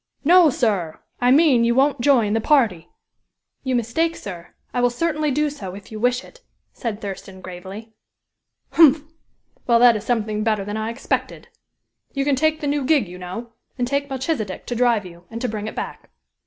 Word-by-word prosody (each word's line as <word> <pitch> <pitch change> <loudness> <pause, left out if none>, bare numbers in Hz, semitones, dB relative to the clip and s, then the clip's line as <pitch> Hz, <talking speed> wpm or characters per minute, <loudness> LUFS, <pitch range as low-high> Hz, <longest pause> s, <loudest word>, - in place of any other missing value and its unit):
"No, 345 +1 +6
sir! 200 - -1 0.2
I 245 - +3
mean 270 -3 +5
you 235 0 +2
won't 275 0 +2
join 235 -6 +3
the 225 - +1
party." 220 - +2 0.8
"You 260 -1 0
mistake, 320 +9 0
sir. 175 -4 -9 0.2
I 245 - 0
will 245 - +4
certainly 305 +4 -1
do 295 +2 0
so, 195 -10 -7
if 200 +2 -12
you 215 - -6
wish 245 +2 +1
it," - - -17 0.3
said 225 -5 -4
Thurston, 195 -2 -7
gravely. 190 +5 -9 0.8
"Humph! 310 -2 +6 0.6
Well, 235 -1 +5
that 240 -1 +6
is 210 - -4
something 215 -2 -1
better 215 -3 0
than 205 +1 -4
I 220 +1 -2
expected. 235 +4 -3 0.6
You 275 -1 -1
can 285 -1 +2
take 310 +3 +1
the 295 - -2
new 285 0 0
gig, 275 - +2
you 180 +1 -10
know, 225 +6 -7 0.2
and 245 -1 -1
take 280 +2 -1
Melchisedek 260 - -3
to 245 - -4
drive 235 -4 +2
you, 175 0 -13
and 230 - -6
to 250 - -1
bring 215 -1 -4
it - - -6
back." - - -6
235 Hz, 190 wpm, -22 LUFS, 210-280 Hz, 0.8 s, No